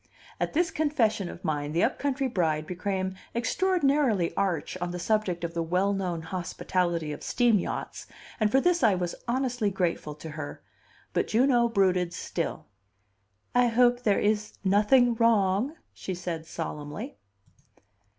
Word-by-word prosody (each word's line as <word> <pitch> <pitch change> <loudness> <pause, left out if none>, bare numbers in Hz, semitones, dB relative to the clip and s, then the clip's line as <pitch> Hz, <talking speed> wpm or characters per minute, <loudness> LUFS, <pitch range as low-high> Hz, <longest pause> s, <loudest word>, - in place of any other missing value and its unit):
At - - -1
this 335 +2 +2
confession 230 - +1
of - - -10
mine 150 -1 -1
the 170 - +2
up 260 - +1
country 275 -1 0
bride 160 -9 0
became 185 +1 -2 0.2
extraordinarily 275 - +2
arch 180 -6 -1
on 175 - -1
the 175 - -4
subject 180 -2 0
of 170 0 -3
the 170 - -1
well 180 +4 +1
known 180 -4 -2
hospitality 175 -2 -2
of 150 - -7
steam 235 -4 +3
yachts, - - -5 0.3
and 215 -2 +2
for 270 - +5
this 350 +3 +2
I 215 -5 +5
was 175 -1 -2
honestly 245 -3 0
grateful 175 -5 -2
to 155 +1 -9
her; 150 -2 -7 0.5
but - - +1
Juno 240 +1 +3
brooded 185 -5 +2
still. 170 - -4 0.9
"I 245 0 +4
hope 245 +1 +3
there 205 -5 +2
is 210 0 0
nothing 215 +6 +4
wrong," 225 +3 +2 0.2
she 190 - -5
said 170 -2 -5
solemnly. 160 - -6
195 Hz, 150 wpm, -27 LUFS, 175-240 Hz, 0.9 s, for